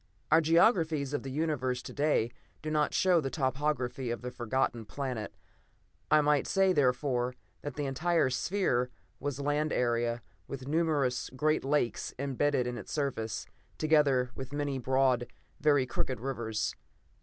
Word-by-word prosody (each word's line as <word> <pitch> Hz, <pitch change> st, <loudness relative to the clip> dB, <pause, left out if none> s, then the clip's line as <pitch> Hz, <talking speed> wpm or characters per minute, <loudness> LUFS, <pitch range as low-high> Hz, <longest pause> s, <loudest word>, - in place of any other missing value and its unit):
Our 165 Hz, -, +7 dB
geographies 160 Hz, -, +3 dB
of 145 Hz, -, -1 dB
the 135 Hz, -, -6 dB
Universe 130 Hz, -4 st, -1 dB
to -, -, -8 dB
day 145 Hz, -6 st, +1 dB, 0.3 s
do 155 Hz, -, -3 dB
not 150 Hz, -1 st, +2 dB
show 180 Hz, -3 st, +3 dB
the 135 Hz, -, -2 dB
topography 135 Hz, -2 st, -1 dB
of 120 Hz, -1 st, -3 dB
the 125 Hz, -, -4 dB
Forgotten 120 Hz, -1 st, -1 dB
Planet: 125 Hz, -2 st, -4 dB, 0.7 s
I 155 Hz, -, +6 dB
might 150 Hz, -1 st, +2 dB
say, 195 Hz, -1 st, +3 dB
therefore, 125 Hz, -3 st, +1 dB, 0.3 s
that 145 Hz, -3 st, -6 dB
the 145 Hz, -, -2 dB
entire 160 Hz, +1 st, +1 dB
sphere 130 Hz, -5 st, +1 dB, 0.3 s
was 145 Hz, -1 st, -3 dB
land 145 Hz, +2 st, 0 dB
area, 120 Hz, -1 st, 0 dB, 0.2 s
with 135 Hz, -1 st, -7 dB
numerous 145 Hz, -5 st, +1 dB
great 155 Hz, +4 st, +1 dB
lakes 135 Hz, -5 st, 0 dB
embedded 140 Hz, 0 st, +1 dB
in 125 Hz, -1 st, -3 dB
its 100 Hz, -, -9 dB
surface, 135 Hz, -7 st, -2 dB, 0.3 s
together 145 Hz, -5 st, +3 dB
with 130 Hz, +1 st, -7 dB
many 145 Hz, -2 st, -1 dB
broad, 130 Hz, -1 st, +2 dB, 0.3 s
very 145 Hz, -3 st, +4 dB
crooked 130 Hz, -1 st, -2 dB
rivers. 115 Hz, -4 st, -2 dB
135 Hz, 145 wpm, -31 LUFS, 125-150 Hz, 0.7 s, Our